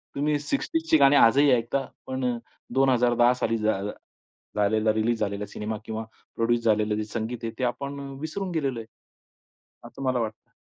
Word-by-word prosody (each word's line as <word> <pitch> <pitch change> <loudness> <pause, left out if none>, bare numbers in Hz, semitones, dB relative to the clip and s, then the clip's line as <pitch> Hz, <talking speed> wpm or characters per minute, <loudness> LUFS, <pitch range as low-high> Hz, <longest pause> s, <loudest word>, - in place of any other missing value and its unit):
तुम्ही 145 +1 +1
60sची 320 - +1
गाणी 140 0 +6
आजही 140 +3 +6
ऐकता 125 +3 +1 0.2
पण 125 -2 -1 0.4
2010 125 -2 +4
साली 115 -2 -1
झा 110 -2 0 0.7
झालेला, 110 +1 +2
रिलीज 110 +1 0
झालेला 105 -1 -2
सिनेमा 105 +1 -4
किंवा 110 0 -4 0.3
प्रोड्यूस 115 +1 +1
झालेलं 105 -1 +2
जे 110 - -1
संगीत 110 +2 -4
आहे, 115 - -2
ते - - -1
आपण 140 +3 -2 0.2
विसरून 185 +4 -4
गेलेलो 140 -7 -1
आहे. 110 - -9 1.0
असं - - -9
मला 130 -2 +1
वाटतं. 110 -2 -5
120 Hz, 150 wpm, -26 LUFS, 110-135 Hz, 1.0 s, गाणी